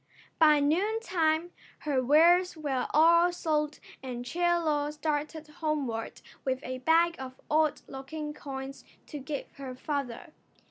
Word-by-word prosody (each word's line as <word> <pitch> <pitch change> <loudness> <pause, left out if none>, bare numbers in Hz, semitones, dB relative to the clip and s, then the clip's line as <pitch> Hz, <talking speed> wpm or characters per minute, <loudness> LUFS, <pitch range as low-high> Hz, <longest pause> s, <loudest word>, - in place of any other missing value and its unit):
By 305 -2 +6
noontime 345 0 +1 0.3
her 280 -4 0
wares 340 +6 +4
were 275 -5 -2
all 335 +3 +5
sold 305 -3 -1 0.2
and 245 -2 -6
Chie 345 +7 -5 0.2
Lo 300 -3 0
started 300 +1 -3
homeward 295 -7 -3 0.2
with 260 -1 -1
a 255 0 -5
bag 330 +5 +3
of 260 0 -8
odd 310 -1 +2
looking 295 +3 -6
coins 270 -1 -7 0.2
to 295 - -7
give 280 +1 -6
her 265 -2 -7
father. 280 +2 -4
300 Hz, 130 wpm, -29 LUFS, 270-320 Hz, 0.3 s, By